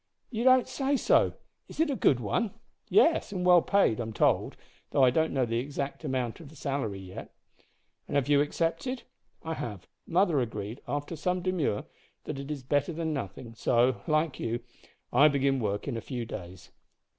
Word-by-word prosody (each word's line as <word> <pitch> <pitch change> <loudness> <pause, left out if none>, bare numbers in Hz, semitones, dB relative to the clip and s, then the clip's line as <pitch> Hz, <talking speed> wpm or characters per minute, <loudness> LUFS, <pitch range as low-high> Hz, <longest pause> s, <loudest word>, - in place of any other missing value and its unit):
"You 230 -1 -2
don't 255 0 +5
say 275 0 0
so! - - +3 0.3
Is - - -12
it 320 -2 +3
a - - 0
good 135 - +3
one?" 195 - -1 0.3
"Yes, 335 - +4
and 180 -3 -2
well 180 -1 +7
paid, 195 - +2
I'm 115 -2 -4
told, - - +2 0.3
though 135 - +3
I 125 - +6
don't 160 +4 +1
know 130 -3 +1
the 115 0 -1
exact 140 +3 -4
amount 130 -5 -2
of 160 -4 -11
the 155 - -15
salary 135 -8 -2
yet." 95 -1 -9 0.8
"And - - -4
have 140 -2 +2
you 145 -1 +5
accepted?" 165 - -1 0.4
"I 160 0 -3
have. 105 - -6 0.2
Mother 175 -3 +3
agreed, 110 0 -4
after 145 +3 -3
some 180 +3 -1
demur, 175 - 0 0.4
that 135 - -5
it 140 +1 -7
is 145 -3 -4
better 145 +4 +1
than 160 -1 -2
nothing, 115 -2 -6
so, 120 +2 +2
like 155 -1 +1
you, 115 +1 -2 0.5
I 140 +5 +7
begin 140 -2 +2
work 105 0 -2
in 135 - -2
a - - -4
few 120 -2 -4
days." 90 -6 -9
140 Hz, 185 wpm, -29 LUFS, 120-170 Hz, 0.8 s, well